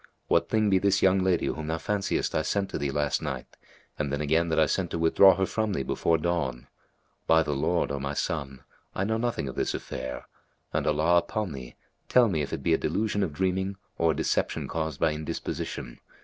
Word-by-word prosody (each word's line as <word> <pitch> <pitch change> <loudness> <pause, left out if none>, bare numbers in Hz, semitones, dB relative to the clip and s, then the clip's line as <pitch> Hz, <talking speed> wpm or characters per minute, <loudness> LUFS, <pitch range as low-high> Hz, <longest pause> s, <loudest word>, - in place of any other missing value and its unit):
What - - +3
thing 110 -2 +2
be 95 - +5
this 100 0 +2
young 95 0 +5
lady 95 -2 +2
whom 80 -1 -3
thou 80 0 -1
fanciest 100 +3 -1
I - - +2
sent 100 +4 -1
to - - -3
thee 70 0 -1
last 75 -1 0
night - - -4 0.5
and 70 -2 -1
then 70 - -1
again 80 +3 +1
that 80 - +2
I 80 - +6
sent 90 +4 -1
to - - -3
withdraw 85 +4 +6
her 95 +1 +1
from 110 +1 -1
thee 70 - -1
before 80 +4 +1
dawn? 75 -7 -2 0.6
By 80 0 +5
the 75 - -2
Lord, 80 +3 0
O 70 - -2
my 70 +1 -3
son, 70 -6 -3 0.3
I 95 - 0
know 110 +3 0
nothing 115 - -1
of 65 - -5
this - - -1
affair, 65 -1 -6 0.5
and - - 0
Allah 85 +3 +3
upon 95 +3 -3
thee, 65 -4 -8 0.3
tell 125 -3 +5
me 80 -5 0
if 70 - -4
it - - -4
be - - +3
a - - +3
delusion 105 -1 0
of 95 -5 0
dreaming 95 +3 -1 0.2
or 85 - +3
a 80 - +2
deception - - -1
caused 80 -3 -3
by 80 - +2
indisposition. 75 -4 -5
80 Hz, 220 wpm, -27 LUFS, 75-95 Hz, 0.6 s, I